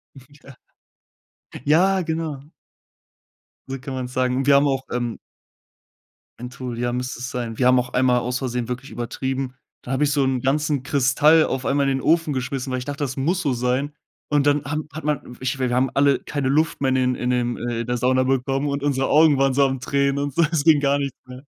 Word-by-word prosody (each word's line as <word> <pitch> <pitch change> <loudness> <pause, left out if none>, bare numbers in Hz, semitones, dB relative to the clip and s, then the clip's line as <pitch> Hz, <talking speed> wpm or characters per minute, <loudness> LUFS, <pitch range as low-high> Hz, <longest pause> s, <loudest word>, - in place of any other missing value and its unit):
Ja. 140 +1 -16 1.1
Ja, 185 +6 +3
genau. 160 -4 -3 1.3
So 135 0 -4
kann 135 +1 -7
man's 125 -1 -5
sagen. 130 0 0
Und 135 +1 -1
wir 140 - +6
haben 140 +1 +4
auch, 135 -1 0
ähm 120 -1 -2 1.2
Menthol, 125 0 -6
ja, 120 0 -1
müsste 125 0 -4
es 125 0 -5
sein. 120 -3 -4
Wir 125 - +3
haben 125 0 +5
auch 125 0 -4
einmal 125 -1 +3
aus 125 +1 -2
Versehen 125 -3 -3
wirklich 125 +2 -5
übertrieben, 130 +2 -3 0.3
da 125 - -7
habe 135 +2 +1
ich 145 - 0
so 145 -1 +2
'n 130 -2 0
ganzen 145 +1 0
Kristall 145 +4 +4
auf 130 - -3
einmal 140 0 +1
in 135 - 0
den - - -5
Ofen 165 -1 +2
geschmissen, 130 0 -3
weil 130 - -1
ich 125 - -7
dachte, 145 +1 -4
das 130 -2 -3
muss 170 +8 0
so 140 -6 0
sein. 125 +4 -1 0.4
Und 145 -1 +2
dann 145 0 +2
haben 155 +1 -3
hat 155 - -7
man 150 -1 0
w 125 - -12
ich 130 +1 -2
wir 130 -1 0
wir 120 - 0
haben 130 +1 +2
alle 140 0 +3
keine 140 -3 -3
Luft 155 +4 +1
mehr 135 - +2
in 130 - +1
den 125 -1 +1
in 125 - -2
den 120 -1 0
äh, 120 -1 -3
in 120 - -6
der 125 0 -1
Sauna 130 +2 +2
bekommen 135 +2 0
und 140 0 -3
unsere 135 -2 0
Augen 155 -1 +5
waren 135 0 +2
so 140 +1 +4
am 135 -1 -1
Tränen 140 +1 0
und 145 -1 -4
so, 170 - +4
es 155 -4 0
ging 160 -3 +5
gar 140 0 +1
nix 140 -1 -2 0.2
mehr. 125 +1 -11
135 Hz, 230 wpm, -22 LUFS, 125-145 Hz, 1.3 s, wir